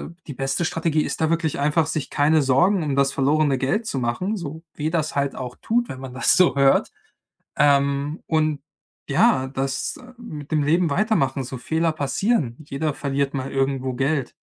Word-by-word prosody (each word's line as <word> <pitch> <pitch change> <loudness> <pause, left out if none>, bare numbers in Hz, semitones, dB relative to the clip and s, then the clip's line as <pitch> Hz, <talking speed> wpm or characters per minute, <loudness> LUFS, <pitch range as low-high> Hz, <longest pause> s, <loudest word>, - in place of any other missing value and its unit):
äh, 175 - -42
die 145 - -5
beste 135 +4 -1
Strategie 160 -1 0
ist - - -4
da 160 - +2
wirklich 165 -3 0
einfach, 150 +3 +2
sich 155 -2 -3
keine 155 +2 +3
Sorgen 170 +8 +3
um 145 -3 -1
das 140 0 +2
verlorene 145 0 +2
Geld 175 - 0
zu 140 - -2
machen, 155 - -1
so 160 -2 -7
weh 155 +1 -2
das 160 -2 -1
halt 140 -1 0
auch 125 -1 -6
tut, 235 +1 0
wenn 130 - -7
man 130 -1 -8
das 130 - +3
so 180 -5 +4
hört. 140 -1 +3 0.7
Ähm, 140 +1 +2
und 155 -2 +1 0.5
ja, 130 0 +3
das 135 0 -3 0.2
mit 155 - -9
dem 150 -1 +2
Leben 165 +4 +2
weitermachen, 140 - +1
so 130 +1 -6
Fehler 160 +6 0
passieren. 155 - 0
Jeder 150 +1 -2
verliert 140 0 -2
mal 135 -1 -3
irgendwo 135 -1 -1
Geld. 135 0 -1
145 Hz, 180 wpm, -23 LUFS, 135-160 Hz, 0.7 s, so